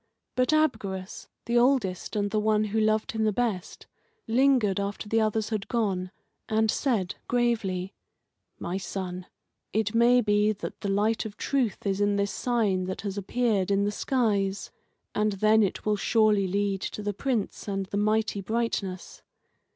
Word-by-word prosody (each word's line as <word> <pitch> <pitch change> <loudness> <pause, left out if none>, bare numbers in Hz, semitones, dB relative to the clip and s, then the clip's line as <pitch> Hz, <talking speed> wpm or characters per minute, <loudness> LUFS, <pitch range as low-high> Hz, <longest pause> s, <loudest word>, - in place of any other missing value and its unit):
But 255 +3 +2
Abgarus, 215 -12 -1 0.2
the 240 0 +3
oldest 240 -9 +1
and 205 -1 0
the 215 - +1
one 215 0 +2
who 215 +1 -1
loved 215 0 +1
him 220 -1 -1
the 215 - +3
best, 210 -5 -2 0.4
lingered 240 -5 +3
after 200 +1 -4
the 225 +1 +2
others 220 0 0
had 215 -3 -3
gone, 195 -6 -1 0.4
and 220 0 +2
said, 220 -10 0
gravely: 215 -6 0 0.6
"My 175 +2 -3
son, 185 -1 -5 0.5
it 215 -1 0
may 240 +2 +5
be 210 0 +2
that 205 - -8
the 200 - -2
light 210 +3 +1
of 210 -1 -8
truth 255 -8 -1
is 195 0 0
in 205 0 +2
this 200 0 0
sign 210 -7 0
that 185 0 -4
has 200 -1 -4
appeared 205 -1 0
in 200 0 +2
the 205 - 0
skies, 205 -5 0 0.4
and 210 0 +1
then 215 +3 +4
it 200 - -1
will 210 -1 +2
surely 210 -2 +3
lead 200 0 -1
to 210 - -5
the 205 0 -1
Prince 235 -1 -2
and 195 -1 -2
the 200 - -4
mighty 215 0 +1
brightness. 200 -3 -3
210 Hz, 165 wpm, -27 LUFS, 195-225 Hz, 0.6 s, may